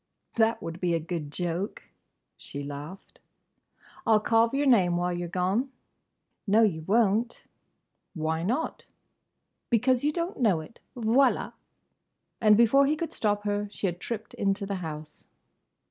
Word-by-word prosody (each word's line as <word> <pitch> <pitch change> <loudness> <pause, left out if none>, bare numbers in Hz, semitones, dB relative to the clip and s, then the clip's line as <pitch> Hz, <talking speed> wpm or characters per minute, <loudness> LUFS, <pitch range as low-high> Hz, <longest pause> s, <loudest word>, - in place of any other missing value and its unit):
"That 225 0 +1
would 165 +1 -6
be 175 -2 +1
a - - 0
good 160 -2 -5
joke!" 175 +5 -3 0.5
she 140 0 -7
laughed. 145 +6 -9 0.8
"I 225 - +3
'll - - +4
carve 225 +2 +3
your 285 +1 +1
name 185 -10 +4
while 175 0 0
you 175 0 -3
're - - -11
gone!" 190 +9 0 0.8
"No, 215 +3 +5
you 170 -7 +1
won't!" 220 +5 +1 0.7
"Why 160 0 -1
not?" 245 - -2 0.8
"Because 250 +2 +2
you 295 - +2
don't 340 +2 -3
know 200 -9 +3
it!—Voilà!" 235 - 0 0.9
And 215 -2 +6
before 275 +5 +5
he 300 - +2
could 330 +1 -4
stop 205 -1 0
her 205 0 -1
she 205 - -5
had 175 -2 -2
tripped 220 0 -5
into 200 0 0
the 195 0 -3
house. 155 -2 -8
205 Hz, 145 wpm, -27 LUFS, 175-235 Hz, 0.9 s, And